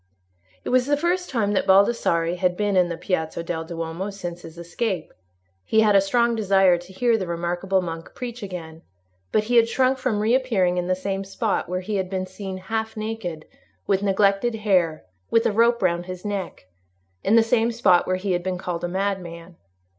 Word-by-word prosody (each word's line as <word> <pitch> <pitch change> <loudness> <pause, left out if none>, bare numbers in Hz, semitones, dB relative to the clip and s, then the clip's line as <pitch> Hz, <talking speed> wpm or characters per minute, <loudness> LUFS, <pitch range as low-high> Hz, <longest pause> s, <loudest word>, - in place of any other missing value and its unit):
It - - -4
was 255 0 +3
the 290 0 +2
first 355 +4 0
time 220 -6 0
that 195 - 0
Baldassarre 190 -4 +3
had 180 0 0
been 205 -1 0
in 180 -1 +3
the 170 - -4
Piazza 165 -2 -2
del 165 -1 -3
Duomo 165 +3 -4
since 175 -3 -7
his 165 0 -12
escape. 175 +1 -3 0.5
He 220 - +3
had 210 -2 +4
a 195 - +7
strong 235 +4 +2
desire 195 -5 +3
to 175 +2 -13
hear 230 +3 +1
the 185 - -3
remarkable 175 +3 -1
monk 165 -1 -7
preach 245 -1 -6
again, 165 -5 -7 0.5
but 215 - +2
he 240 +3 +1
had 230 0 +5
shrunk 260 +1 +2
from 255 -5 0
reappearing 215 -6 +2
in 175 - -3
the 185 - +1
same 195 +1 -3
spot 195 +1 -2
where 180 +1 -2
he 205 +2 -3
had 190 -1 -2
been 185 -1 -2
seen 190 0 -7
half 220 +4 -4
naked, 215 -8 -5 0.4
with 195 -1 +1
neglected 200 +3 +2
hair, 180 - +1 0.2
with 230 - +3
a - - +3
rope 235 +1 +3
round 175 -1 0
his 185 +1 -7
neck—in 95 - -4
the 230 - +6
same 230 0 +2
spot 205 -7 +3
where 185 - +1
he 190 +1 -2
had 175 -1 +1
been 185 0 -3
called 175 -1 -4
a - - 0
madman. 180 -2 -4
190 Hz, 195 wpm, -23 LUFS, 175-220 Hz, 0.5 s, a